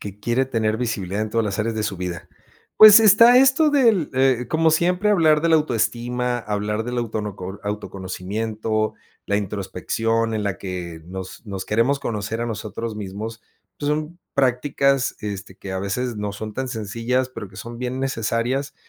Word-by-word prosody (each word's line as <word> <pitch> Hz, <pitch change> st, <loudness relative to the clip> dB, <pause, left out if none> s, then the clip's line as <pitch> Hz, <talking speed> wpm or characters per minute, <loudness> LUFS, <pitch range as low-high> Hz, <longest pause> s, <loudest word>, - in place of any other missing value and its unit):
Que 100 Hz, 0 st, -8 dB
quiere 130 Hz, +3 st, +1 dB
tener 110 Hz, -4 st, 0 dB
visibilidad 105 Hz, -4 st, -2 dB
en 110 Hz, -, -4 dB
todas 115 Hz, -1 st, +1 dB
las 100 Hz, -1 st, -3 dB
áreas 110 Hz, +1 st, -1 dB
de 110 Hz, -, -1 dB
su 100 Hz, -4 st, -3 dB
vida. 90 Hz, -2 st, -5 dB, 0.5 s
Pues, 215 Hz, 0 st, +11 dB
está 225 Hz, +3 st, +7 dB
esto 270 Hz, +4 st, +5 dB
del, 230 Hz, -, +3 dB
eh, 130 Hz, -2 st, +2 dB
como 160 Hz, 0 st, +3 dB
siempre, 180 Hz, +6 st, +2 dB
hablar 155 Hz, -6 st, +4 dB
de 165 Hz, -, +1 dB
la 165 Hz, -, +5 dB
autoestima, 125 Hz, -2 st, -1 dB
hablar 105 Hz, 0 st, -2 dB
del 120 Hz, 0 st, -3 dB
autonoco 105 Hz, -4 st, -4 dB
autoconocimiento, 105 Hz, +2 st, -3 dB, 0.3 s
la 100 Hz, -, +1 dB
introspección 110 Hz, +3 st, -1 dB
en 105 Hz, -, -1 dB
la 100 Hz, -2 st, -2 dB
que 90 Hz, -3 st, -6 dB
nos 95 Hz, +4 st, -8 dB
nos 95 Hz, -2 st, -5 dB
queremos 120 Hz, +6 st, +1 dB
conocer 110 Hz, 0 st, -3 dB
a 120 Hz, -, -1 dB
nosotros 110 Hz, 0 st, -5 dB
mismos, 105 Hz, +3 st, -6 dB, 0.4 s
pues, 145 Hz, -, -2 dB
son 155 Hz, +3 st, -2 dB, 0.2 s
prácticas, 135 Hz, 0 st, +1 dB
este, 100 Hz, -2 st, -6 dB
que 95 Hz, -, -8 dB
a 95 Hz, -, -2 dB
veces 115 Hz, +5 st, -2 dB
no 105 Hz, -1 st, -3 dB
son 110 Hz, +1 st, -6 dB
tan 130 Hz, 0 st, -2 dB
sencillas, 115 Hz, +3 st, -1 dB
pero 105 Hz, -6 st, -8 dB
que 95 Hz, -, -16 dB
son 120 Hz, 0 st, -8 dB
bien 125 Hz, +1 st, -3 dB
necesarias, 130 Hz, +1 st, -1 dB
115 Hz, 170 wpm, -22 LUFS, 105-130 Hz, 0.5 s, Pues